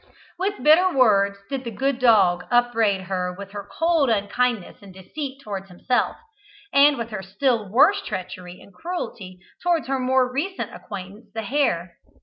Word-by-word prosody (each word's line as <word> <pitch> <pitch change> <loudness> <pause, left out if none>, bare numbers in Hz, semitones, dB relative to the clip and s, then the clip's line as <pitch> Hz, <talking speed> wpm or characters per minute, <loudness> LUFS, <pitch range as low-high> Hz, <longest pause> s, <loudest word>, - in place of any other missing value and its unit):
With 400 +2 -2
bitter 345 +5 +6
words 200 - +3
did 270 -2 -4
the 235 - -4
good 265 +4 -1
dog 205 -8 +4
upbraid 230 -5 +2
her 180 -1 -3
with 200 0 -9
her 205 -1 -8
cold 325 -5 +2
unkindness 220 0 0
and 200 -1 -13
deceit 265 +9 -7
towards 195 -2 -6
himself, 245 +8 -1 0.6
and 285 +1 +6
with 235 -1 -5
her 210 -3 -4
still 215 +2 -1
worse 300 - +4
treachery 180 - -7
and 200 - -17
cruelty 235 - -6 0.2
towards 345 -3 +1
her 270 0 -1
more 255 0 +2
recent 370 +8 -3
acquaintance, 200 +3 -9
the 225 - -3
hare. 190 -9 -1
230 Hz, 155 wpm, -23 LUFS, 195-275 Hz, 0.6 s, bitter